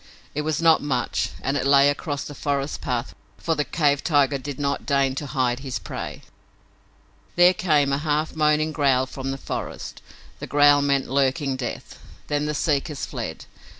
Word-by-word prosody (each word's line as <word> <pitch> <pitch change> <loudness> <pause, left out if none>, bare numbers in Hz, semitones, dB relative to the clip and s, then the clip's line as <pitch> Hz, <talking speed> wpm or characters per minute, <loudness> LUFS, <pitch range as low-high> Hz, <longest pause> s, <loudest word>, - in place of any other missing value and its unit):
It 150 - -1
was 155 +1 -1
not 165 -1 +5
much 130 -4 -1
and 135 - 0
it - - 0
lay 140 0 +6
across 145 0 -2
the 145 - -8
forest 140 0 -2
pathway, 120 - -3 0.2
for 165 - -1
the 150 - 0
cave 145 -2 +1
tiger 145 -3 +2
did 140 0 -6
not 140 0 -1
deign 140 -2 +1
to 145 +2 -5
hide 130 -3 0
his 130 -2 -4
prey. - - -7 1.1
There 175 +1 +6
came 150 -6 +2
a 140 - +1
half 155 +1 -1
moaning 155 0 +2
growl 135 -4 +2
from 135 0 -6
the 135 - -3
forest. - - -6 0.4
That - - -6
growl 145 0 +5
meant 140 -1 +1
lurking 135 +1 +1
death. 130 -2 -6 0.3
Then 145 0 0
the 150 - -2
seekers 145 -1 -1
fled. 115 - -6
145 Hz, 175 wpm, -24 LUFS, 135-150 Hz, 1.1 s, lay